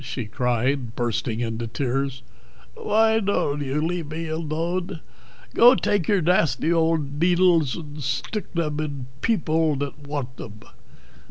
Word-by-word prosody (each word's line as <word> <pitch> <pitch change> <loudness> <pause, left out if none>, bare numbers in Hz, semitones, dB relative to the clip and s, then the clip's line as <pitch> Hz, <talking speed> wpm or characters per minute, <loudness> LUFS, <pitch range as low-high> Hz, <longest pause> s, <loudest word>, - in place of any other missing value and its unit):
she 125 -1 -4
cried, 125 +1 -1
bursting 120 -1 -1
into 115 0 -3
tears. 130 +1 -2 0.5
"Why 220 +1 +2
dod't 170 -8 0
you 140 +1 -1
leave 170 -3 -3
be 160 +1 -4
alode? 165 +3 -2 0.5
Go 245 +3 +7
take 200 -10 0
your 200 -3 +3
dasty 165 -2 +2
old 160 -4 +1
deedles 175 -4 +3
ad 150 -2 -8
stick 140 - -3
theb 155 -3 -1
id 140 -4 -4 0.2
people 160 -8 +1
that 145 +1 -5
wadt 135 -4 -4
theb." 105 -1 -10
150 Hz, 135 wpm, -24 LUFS, 130-170 Hz, 0.5 s, Go